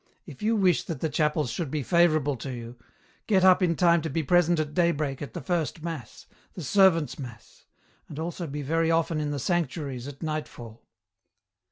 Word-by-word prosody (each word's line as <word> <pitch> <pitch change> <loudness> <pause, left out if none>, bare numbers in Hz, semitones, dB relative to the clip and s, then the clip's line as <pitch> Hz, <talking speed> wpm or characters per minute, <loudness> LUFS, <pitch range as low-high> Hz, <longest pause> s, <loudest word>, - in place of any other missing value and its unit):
If - - -12
you 220 +2 +2
wish 185 -5 +3
that 160 -6 -5
the 160 - -1
chapels 150 -4 0
should 155 +4 -3
be 150 0 -2
favourable 155 -4 +3
to 120 - -6
you, 120 -1 -7 0.5
get 195 -4 +3
up 185 0 +6
in 170 -2 +2
time 170 -1 +4
to 160 - -3
be 160 +3 -1
present 175 +1 +3
at 150 -1 -2
daybreak 155 -6 0
at 145 - -7
the - - -4
first 165 -3 -2
mass, 160 -10 -7 0.3
the 175 - -6
servants' 165 0 +3
mass, 125 -5 -11 0.4
and - - -9
also 170 +1 -4
be 145 0 -5
very 165 +3 +1
often 165 -1 +1
in 150 -1 -2
the 145 - -2
sanctuaries 140 -5 -2
at 145 +2 -9
nightfall." 150 -7 -5
155 Hz, 190 wpm, -27 LUFS, 140-170 Hz, 0.5 s, up